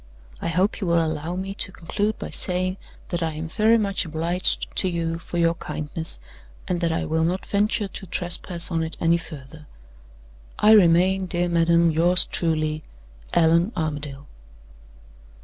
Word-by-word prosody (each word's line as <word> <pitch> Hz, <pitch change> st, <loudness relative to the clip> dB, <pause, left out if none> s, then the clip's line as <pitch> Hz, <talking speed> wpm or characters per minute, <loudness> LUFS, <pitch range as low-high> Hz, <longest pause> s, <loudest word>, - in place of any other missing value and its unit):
I -, -, -3 dB
hope 185 Hz, +7 st, 0 dB
you 190 Hz, -, -2 dB
will 170 Hz, 0 st, +3 dB
allow 160 Hz, +2 st, -4 dB
me 190 Hz, +1 st, -4 dB
to 195 Hz, -, -2 dB
conclude 205 Hz, +5 st, -3 dB
by -, -, -7 dB
saying 185 Hz, +1 st, +1 dB, 0.3 s
that 175 Hz, -1 st, -3 dB
I 160 Hz, -1 st, -1 dB
am 155 Hz, +2 st, -5 dB
very 220 Hz, +7 st, +3 dB
much 200 Hz, -3 st, 0 dB
obliged 170 Hz, +2 st, -1 dB
to 185 Hz, -, +2 dB
you 165 Hz, -1 st, -3 dB
for 175 Hz, -, -7 dB
your 165 Hz, -1 st, +3 dB
kindness, 160 Hz, 0 st, -4 dB, 0.5 s
and 180 Hz, -2 st, -2 dB
that 170 Hz, -1 st, +1 dB
I 160 Hz, -, -2 dB
will 160 Hz, +1 st, 0 dB
not 180 Hz, +3 st, -1 dB
venture 205 Hz, +1 st, 0 dB
to 190 Hz, 0 st, -8 dB
trespass 175 Hz, 0 st, +1 dB
on 165 Hz, -1 st, 0 dB
it 160 Hz, 0 st, -4 dB
any 170 Hz, 0 st, +3 dB
further. 150 Hz, -2 st, -11 dB, 0.9 s
"I 210 Hz, -, +5 dB
remain, 185 Hz, -1 st, +4 dB
dear 175 Hz, 0 st, 0 dB
madam, 170 Hz, 0 st, +3 dB
yours 170 Hz, +3 st, +4 dB
truly, 155 Hz, -2 st, -1 dB, 0.5 s
"ALLAN 170 Hz, +6 st, +3 dB
ARMADALE." 145 Hz, -3 st, -4 dB
170 Hz, 160 wpm, -23 LUFS, 160-185 Hz, 0.9 s, I